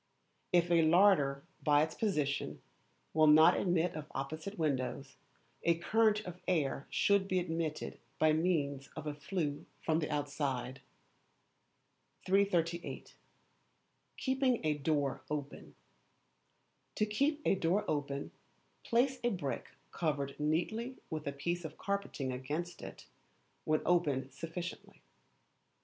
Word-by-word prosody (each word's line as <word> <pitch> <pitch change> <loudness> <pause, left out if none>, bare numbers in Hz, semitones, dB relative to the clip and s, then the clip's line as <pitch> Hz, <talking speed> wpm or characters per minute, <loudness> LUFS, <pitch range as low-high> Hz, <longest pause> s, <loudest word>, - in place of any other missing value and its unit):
If 175 -1 +3
a 170 -1 +6
larder, 160 -5 +4 0.2
by 150 -1 +4
its 160 - -3
position, 150 -10 -1 0.5
will 155 0 +5
not 155 +1 +8
admit 175 -1 +1
of 155 -1 -7
opposite 155 +9 -4
windows, 135 -3 -2 0.5
a 170 -1 +3
current 215 +4 +3
of 180 -3 -9
air 145 -6 0
should 200 -1 +3
be 185 - +1
admitted 165 -3 -2 0.2
by 155 0 +4
means 150 -5 0
of 155 - -6
a 150 - -2
flue 150 -1 -3
from 160 0 +1
the 155 - -2
outside. 140 -3 -2 1.4
338. 175 -3 0 1.0
Keeping 260 - +1
a 155 - +3
Door 145 -2 0
Open. 145 -1 -5 1.2
To 215 - +2
keep 280 +9 +1
a - - +4
door 190 +3 +1
open, 140 -2 -2 0.5
place 255 +2 +2
a 240 - +3
brick 145 - -3 0.2
covered 145 -4 -1
neatly 220 +12 -1
with 155 -2 -4
a - - 0
piece 170 +5 -2
of 155 -1 -7
carpeting 200 -9 -2
against 150 +8 -4
it, - - -9 0.6
when 155 0 +2
opened 140 -7 +1
sufficiently. 170 +4 -7
160 Hz, 120 wpm, -34 LUFS, 145-185 Hz, 1.4 s, not